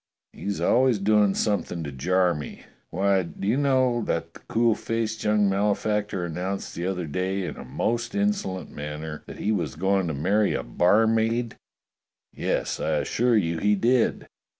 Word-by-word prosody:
He's 100 0 -4
always 125 -2 +3
doing 105 0 +3
something 100 -5 -1
to 70 - -5
jar 90 +6 +2
me. 75 -2 -7 0.3
Why, 95 +2 +2
do 90 +2 -6
you 110 - +3
know, 130 -4 +2
that - - -2
the - - -13
cool 115 0 +3
faced 110 0 -3
young 105 -1 +3
malefactor 100 -1 0
announced 90 +4 -4
the 85 +2 -3
other 90 -2 -2
day 95 +5 -2
in - - -4
the - - -9
most 120 - -2
insolent 200 - -1
manner 75 +1 -6
that - - -9
he 105 - -1
was 105 - -1
going 95 +2 +1
to 80 - -2
marry 100 +8 +2
a - - -2
barmaid.^ 110 - +2 0.8
Yes, - - -2
I - - 0
assure 120 -1 +2
you 85 -5 0
he 105 +3 +3
did. 120 +4 +1
100 Hz, 165 wpm, -25 LUFS, 90-115 Hz, 0.8 s, always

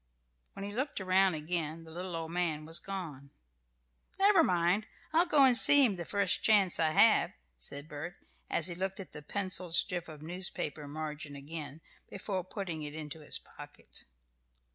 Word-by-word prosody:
When 195 - -7
he 205 - -7
looked 265 +4 -3
around 190 -1 +2
again 160 0 -4
the 160 - -14
little 180 +1 -6
old 165 0 -5
man 165 -3 -2
was 165 +1 +1
gone. 160 -8 -7 0.9
"Never 390 -3 +5
mind, 180 - +1 0.3
I'll 340 +3 +3
go 300 -5 +5
and 255 -2 +7
see 285 +3 +9
him 210 -5 0
the 170 -2 -6
first 200 0 +1
chance 200 -5 +3
I 160 -1 +2
have," 205 +7 +4 0.2
said 140 - -6
Bert, 155 +4 -7 0.3
as 165 - +2
he 175 - -1
looked 190 +3 -4
at 190 - -9
the 150 - -9
pencilled 185 0 -2
strip 175 -1 +2
of 155 -2 -11
newspaper 160 -4 -4
margin 150 -1 -6
again 150 +1 -8 0.3
before 190 -1 -4
putting 180 -4 -6
it 150 0 -7
into 155 0 -6
his 150 - -3
pocket. - - -13
175 Hz, 170 wpm, -31 LUFS, 155-195 Hz, 0.9 s, see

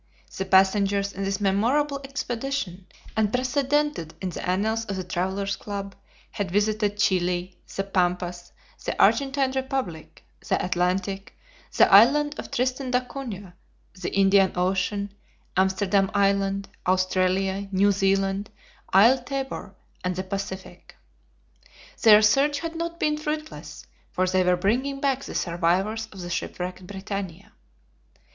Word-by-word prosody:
The 190 - -2
passengers 195 +1 +3
in 195 +1 -4
this 195 0 -1
memorable 255 +9 +1
expedition, 250 -8 -4 0.3
unprecedented 260 - 0
in 185 -1 -3
the - - -6
annals 220 +5 0
of 200 - -4
the 185 - -3
Travelers' 190 +2 -2
Club, 200 -1 -6 0.4
had 205 -4 -3
visited 210 +1 0
Chili, 180 -2 0 0.2
the 195 - -1
Pampas, 180 -2 -1 0.3
the - - -3
Argentine 275 -1 +3
Republic, 265 - -4 0.2
the - - +1
Atlantic, 185 +2 -1 0.4
the - - +7
island 290 +8 +6
of - - -6
Tristan 255 +1 -1
d'Acunha, 250 -7 -3 0.4
the 185 -2 -5
Indian 195 -1 +5
Ocean, 190 +2 -1 0.4
Amsterdam 190 +1 +2
Island, 195 0 +1 0.2
Australia, 185 +1 +1
New 200 +1 +4
Zealand, 195 +1 +1 0.4
Isle 230 +8 +6
Tabor, 270 -6 -5 0.3
and 180 0 -1
the 185 - -3
Pacific. 190 0 -7 1.1
Their 215 -1 +8
search 280 +7 +3
had 330 0 -5
not 335 +1 -4
been 300 0 +1
fruitless, 305 0 -5 0.2
for 185 - 0
they 185 0 +2
were 180 0 +3
bringing 255 +9 0
back 275 -1 0
the - - -7
survivors 185 +6 0
of 190 - -9
the 175 0 -6
shipwrecked 180 +1 -4
BRITANNIA. 195 -2 -6
200 Hz, 125 wpm, -25 LUFS, 185-250 Hz, 1.1 s, Their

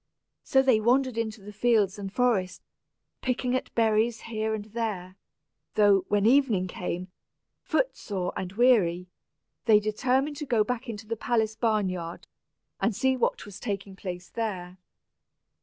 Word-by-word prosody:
So 265 0 +3
they 255 -5 +4
wandered 250 +2 +2
into 220 -2 -3
the 210 +1 -10
fields 210 -3 +2
and 195 -1 -5
forest, 205 -6 0 0.6
picking 250 0 0
at 255 - -3
berries 225 0 +2
here 220 -1 -2
and 210 -1 -6
there; 210 -5 -4 0.6
though, 200 -3 +5
when 205 0 +2
evening 235 -6 +4
came, 180 0 -5 0.5
footsore 200 - -1
and 185 -1 -4
weary, 195 -7 +3 0.6
they 215 -3 +6
determined 260 +7 0
to 295 - -4
go 225 -4 +3
back 250 +2 -4
into 215 -1 -6
the 230 +1 -3
palace 220 -1 0
barn 215 -4 +1
yard, 175 -2 -5 0.5
and 225 - +1
see 260 +3 +2
what 250 - -1
was 200 -1 -10
taking 200 -3 -4
place 180 -2 -6
there. 185 -5 -4
215 Hz, 145 wpm, -27 LUFS, 195-240 Hz, 0.6 s, they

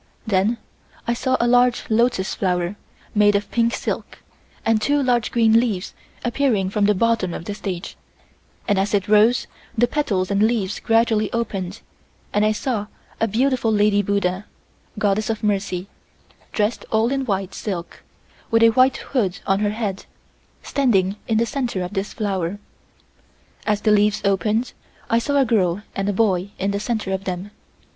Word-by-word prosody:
Then 215 +2 +1 0.5
I 235 - +2
saw 255 +2 0
a 235 - +2
large 245 0 +3
lotus 230 -3 +1
flower, 180 0 -1 0.4
made 205 -1 +4
of 200 - -1
pink 235 0 +2
silk, - - -4 0.5
and 225 -1 +2
two 290 +4 +2
large 240 -4 +1
green 225 -1 +5
leaves 215 -7 -2 0.3
appearing 240 -6 +1
from 205 0 +2
the 210 0 +3
bottom 220 -4 +1
of 165 - -7
the 205 - -4
stage, 190 -3 -5 0.7
and 205 -4 +2
as 200 +2 +1
it 200 0 0
rose 215 +4 +4 0.3
the 240 - +5
petals 210 -9 -1
and 200 0 +2
leaves 215 -3 +1
gradually 225 -2 +2
opened 200 -4 -3 0.5
and 205 - +3
I 215 - +3
saw 215 -2 -2 0.3
a 225 - +2
beautiful 240 +1 +1
lady 205 -1 +3
buddha 200 -1 -1 0.5
(Goddess 210 +1 +1
of 220 -1 -2
Mercy) 195 -3 -1 0.7
dressed 210 +2 0
all 225 +2 +2
in 275 0 0
white 195 -5 -2
silk, 180 -5 -5 0.5
with 225 0 +4
a 230 - +8
white 255 +3 +4
hood 205 -9 -1
on 195 0 +2
her 205 0 +1
head, 210 -3 -3 0.6
standing 200 -9 +1
in 225 - +1
the 230 - +3
center 240 -8 -2
of 180 +3 -6
this 195 0 -2
flower. 195 -3 -2 1.1
As 210 -1 +1
the 215 - +3
leaves 210 0 +3
opened 210 +5 +1 0.4
I 230 - +4
saw 285 +4 0
a 270 - +4
girl 200 -4 +1
and 195 +1 -1
a - - +3
boy 195 -3 +1
in 195 +1 -1
the 200 - -1
center 215 -3 -2
of 190 +1 -3
them. 185 +2 -4
210 Hz, 165 wpm, -22 LUFS, 195-230 Hz, 1.1 s, a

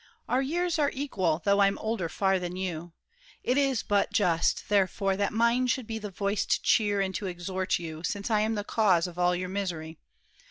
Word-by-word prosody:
Our 255 +2 +2
years 340 +4 -1
Are 290 -1 +3
equal, 185 - -1
though 200 0 +3
I'm 195 0 +3
older 220 -6 -2
far 190 +2 +1
than 180 0 -5
you. 175 -3 -4 0.5
It 250 - +1
is 275 -4 +1
but 205 -1 +1
just, 170 -5 +1
therefore, 195 -1 +1
that 200 0 0
mine 235 +3 +2
should 250 0 0
be 225 0 -4
The 210 -1 -6
voice 200 +1 -1
to - - +1
cheer 205 -3 +3
and 190 -1 -1
to 195 - -3
exhort 185 +1 -2
you, 160 -2 -7
since 200 +5 -3
I 215 - +3
am 220 +1 0
the 205 - -2
cause 195 -6 +2
of 180 -1 -7
all 180 0 +3
your 180 +1 -4
misery. 170 -5 -4
200 Hz, 205 wpm, -28 LUFS, 180-220 Hz, 0.5 s, Are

